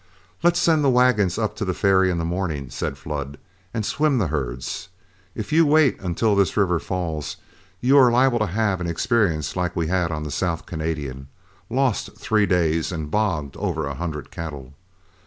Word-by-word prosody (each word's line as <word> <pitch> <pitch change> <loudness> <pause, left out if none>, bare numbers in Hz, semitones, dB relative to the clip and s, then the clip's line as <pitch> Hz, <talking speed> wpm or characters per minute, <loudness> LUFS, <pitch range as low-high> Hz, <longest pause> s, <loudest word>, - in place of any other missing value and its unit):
"Let's 175 +1 +3
send 160 -3 +3
the 140 - +4
wagons 120 -8 +3
up 110 -2 -1
to - - -2
the 90 -3 -1
ferry 95 -2 +3
in 90 - 0
the 85 - -1
morning," 85 -7 -3
said 70 - -3
Flood, 70 -2 -5 0.3
"and 110 -3 -2
swim 145 +3 +1
the 100 -9 0
herds. 65 -4 -4 0.5
If - - -5
you 165 +1 +6
wait 155 -3 +4
until 100 +4 +1
this 100 -2 +2
river 90 -4 +2
falls, 80 -5 -4 0.4
you 130 +3 +4
are 130 -2 +7
liable 125 0 +3
to 110 - +1
have 100 -1 0
an 90 - -2
experience 85 - 0
like 90 -1 -1
we 85 -3 0
had 90 -2 +1
on 75 -1 -3
the 75 - -5
South 85 -1 -2
Canadian, 75 -5 -4 0.4
lost 130 -2 0
three 110 -4 +1
days 85 -3 +1
and 80 -4 -5
bogged 85 -10 -1
over 85 -7 -2
a 70 - -3
hundred 75 -1 -5
cattle. 70 -5 -7
90 Hz, 185 wpm, -23 LUFS, 80-110 Hz, 0.5 s, are